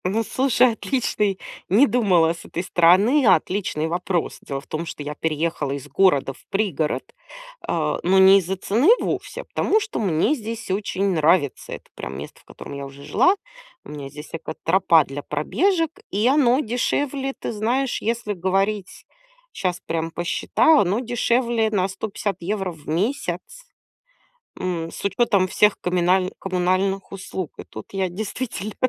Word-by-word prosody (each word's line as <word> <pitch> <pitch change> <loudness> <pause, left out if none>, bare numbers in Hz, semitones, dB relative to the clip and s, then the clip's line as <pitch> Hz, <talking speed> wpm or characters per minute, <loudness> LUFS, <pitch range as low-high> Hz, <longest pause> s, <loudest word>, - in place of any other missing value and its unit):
Ну, 210 +5 +1
слушай, 255 0 +3
отличный- 215 -4 -1 0.3
не 220 +9 +6
думала 190 - +3
с 170 - -12
этой 175 - -4
стороны- 190 - +4
отличный 180 -3 +1
вопрос. 175 +1 -2
Дело 135 - -5
в - - -15
том, 160 +2 -4
что 150 - -6
я 150 +1 -4
переехала 155 -2 -2
из 140 0 -6
города 145 -6 +2
в - - -21
пригород, 185 -7 -1 0.6
а, - - 0
но 185 +2 +3
не 190 +1 +8
из-за 190 +1 -3
цены 220 - +2
вовсе, - - -3
а - - -12
потому 435 - +1
что 430 0 -4
мне 185 - +2
здесь 230 -4 -6
очень 195 0 -1
нравится. 155 -3 +1
Это - - -9
прям 65 +2 -6
место, 70 - -9
в - - -33
котором - - -10
я 140 0 -5
уже 140 +1 -13
жила. 365 - +3 0.5
У - - -11
меня 145 -2 -7
здесь 150 +2 -10
экотропа 165 0 +2
для 135 +1 -6
пробежек, 325 - 0 0.2
и 210 +4 +1
оно 260 -2 +4
дешевле. 270 +3 -1
Ты - - -4
знаешь, 240 +5 -1
если 230 -1 -1
говорить, 195 +2 -1 0.5
щас 180 -2 -2
прям 165 0 -2
посчитала- 290 - +3
оно 195 +4 +1
дешевле 240 -1 +1
на 195 -3 +1
150 195 -1 -3
в 155 -3 -16
месяц. 205 - -1 1.2
М, 170 -3 -2
с - - -9
учетом 200 -1 +2
всех 210 +2 +3
коминальн 180 +1 +2
коммунальных 190 +1 0
услуг. 190 -3 -5
И - - -6
тут 110 - -10
я 190 -1 0
действительно, 215 +2 -5
190 Hz, 155 wpm, -22 LUFS, 165-225 Hz, 1.2 s, не